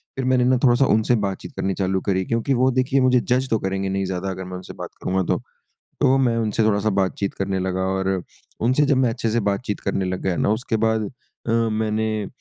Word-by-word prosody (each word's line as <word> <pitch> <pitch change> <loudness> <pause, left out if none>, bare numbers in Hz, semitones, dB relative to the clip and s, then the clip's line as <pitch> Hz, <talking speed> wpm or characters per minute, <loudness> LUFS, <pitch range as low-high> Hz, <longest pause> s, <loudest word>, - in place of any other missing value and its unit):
फिर 130 - -2
मैंने 130 -1 +3
ना 130 0 +4
थोड़ा-सा 130 +1 +5
उनसे 110 +2 +3
बातचीत 95 -1 -5
करनी 95 0 -1
चालू 95 0 -1
करी 95 -2 0
क्योंकि 115 +6 0
वो 130 +1 +3
देखिए 130 +1 +2
मुझे 130 -1 +4
जज़ 130 +2 0
तो 110 - +2
करेंगे 95 0 -2
नहीं 95 0 -1
ज़्यादा 95 +1 -3
अगर 95 0 -5
मैं 90 0 -7
उनसे 90 - -9
बात - - -7
करूँगा 95 0 +1
तो। - - -2 0.6
तो 130 - +4
मैं 120 -3 +2
उनसे 110 -1 0
थोड़ा-सा 110 0 +2
बातचीत 100 0 -1
करने 95 0 -2
लगा 95 0 -1 0.2
और 95 -1 -1 0.4
उनसे 125 +6 +2
जब 140 -1 +3
मैं 130 -1 +3
अच्छे 115 0 -2
से 120 +2 +1
बातचीत 105 +1 -3
करने 95 - -1
लग 90 0 -3
गया 95 -2 0
ना - - +1
उसके 110 0 -1
बाद 110 0 +1 0.4
अ, - - -1
मैंने, 110 -2 0
110 Hz, 220 wpm, -22 LUFS, 95-125 Hz, 0.6 s, थोड़ा-सा